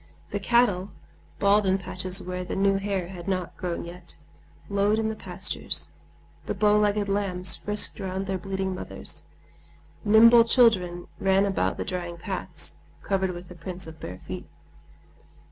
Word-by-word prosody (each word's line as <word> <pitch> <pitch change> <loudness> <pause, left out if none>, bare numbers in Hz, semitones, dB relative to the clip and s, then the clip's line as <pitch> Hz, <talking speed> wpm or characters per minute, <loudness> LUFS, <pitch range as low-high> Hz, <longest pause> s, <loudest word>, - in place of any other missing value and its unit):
The 205 - -1
cattle, 205 -4 +2 0.5
bald 200 +1 +4
in 190 -1 +2
patches 185 0 +3
where 180 0 -4
the 180 - -5
new 195 0 +3
hair 195 -3 -2
had 180 -1 -9
not 185 -3 -2
grown 175 -3 -4
yet, 175 0 -4 0.5
lowed 200 +1 +2
in 220 0 0
the 220 - -3
pastures; - - -3 0.6
the - - -2
bowlegged 210 0 +3
lambs 190 -3 0
frisked 210 +1 +1
round 190 0 -3
their 190 -1 -2
bleating 190 0 -2
mothers. 185 - -3 0.8
Nimble 230 +2 +8
children 190 -8 +3
ran 195 +1 +3
about 195 -1 0
the - - -3
drying 175 -2 -4
paths, 165 - -6 0.3
covered 190 -1 0
with 175 0 -7
the 180 - -10
prints 180 +1 -7
of 160 -1 -11
bare 90 +2 -8
feet. 90 -4 -6
190 Hz, 150 wpm, -26 LUFS, 180-205 Hz, 0.8 s, Nimble